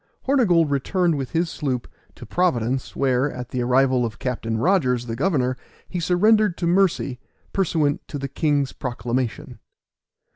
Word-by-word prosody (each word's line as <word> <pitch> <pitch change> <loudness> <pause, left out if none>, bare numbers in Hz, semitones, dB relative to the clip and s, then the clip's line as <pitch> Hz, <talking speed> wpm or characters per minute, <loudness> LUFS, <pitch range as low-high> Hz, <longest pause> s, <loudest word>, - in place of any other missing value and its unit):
Hornygold 185 - +3
returned 170 +5 +1
with 135 -3 -3
his 170 +1 +1
sloop 130 -5 -3 0.3
to - - -10
Providence, 130 -8 0
where, 135 +1 +1
at 125 -1 -7
the 125 - -2
arrival 130 +1 +3
of 110 -2 -3
Captain 115 -3 -3
Rogers, 125 - +2
the 115 -1 -4
governor, 130 -3 +1 0.3
he 180 - -4
surrendered 205 +3 +3
to 175 - -2
mercy, 170 -8 +1 0.3
pursuant 155 -6 +1
to 145 - -5
the 140 0 -4
king's 145 0 0
proclamation. 120 -1 -3
140 Hz, 145 wpm, -23 LUFS, 125-175 Hz, 0.3 s, Hornygold